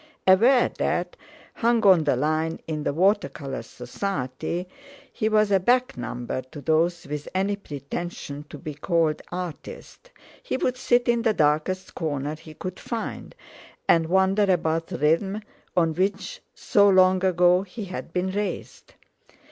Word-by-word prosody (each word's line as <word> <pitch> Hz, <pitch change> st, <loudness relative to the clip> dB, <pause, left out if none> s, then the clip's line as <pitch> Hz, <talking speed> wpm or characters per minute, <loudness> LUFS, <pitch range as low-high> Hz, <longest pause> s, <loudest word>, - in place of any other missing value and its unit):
Aware 235 Hz, +7 st, +5 dB
that, -, -, -1 dB, 0.4 s
hung 235 Hz, -1 st, +1 dB
on 180 Hz, -5 st, +6 dB
the 145 Hz, -, +3 dB
line 155 Hz, +4 st, -1 dB
in 155 Hz, -2 st, -3 dB
the -, -, +1 dB
Water 195 Hz, +7 st, +2 dB
Colour 135 Hz, -5 st, -6 dB
Society, 130 Hz, -, -4 dB, 0.5 s
he 220 Hz, -, 0 dB
was 215 Hz, -1 st, +3 dB
a 195 Hz, -, +5 dB
back 250 Hz, +6 st, +2 dB
number 120 Hz, +1 st, -4 dB
to 140 Hz, +4 st, -12 dB
those 165 Hz, +3 st, +1 dB
with 150 Hz, +1 st, -5 dB
any 195 Hz, +2 st, +1 dB
pretension 145 Hz, -3 st, -6 dB
to -, -, -8 dB
be 155 Hz, -3 st, -7 dB
called 155 Hz, +1 st, 0 dB
artists, 180 Hz, -, -7 dB, 0.3 s
he -, -, -3 dB
would 255 Hz, -1 st, 0 dB
sit 245 Hz, -1 st, +2 dB
in 235 Hz, -1 st, +3 dB
the 225 Hz, -2 st, +1 dB
darkest 155 Hz, +5 st, 0 dB
corner 145 Hz, -3 st, -3 dB
he 155 Hz, 0 st, -13 dB
could 185 Hz, +3 st, -6 dB
find, 230 Hz, -, -5 dB, 0.5 s
and 165 Hz, -1 st, +4 dB
wonder 190 Hz, +2 st, +3 dB
about 165 Hz, -2 st, 0 dB
rhythm, 180 Hz, +9 st, 0 dB, 0.3 s
on 165 Hz, -2 st, +3 dB
which 190 Hz, +2 st, -2 dB
so 200 Hz, 0 st, +4 dB
long 185 Hz, -1 st, +4 dB
ago 180 Hz, -1 st, +4 dB
he 200 Hz, +2 st, -7 dB
had 185 Hz, -2 st, -7 dB
been 180 Hz, +2 st, -1 dB
raised. 205 Hz, +1 st, -5 dB
180 Hz, 150 wpm, -25 LUFS, 155-200 Hz, 0.5 s, on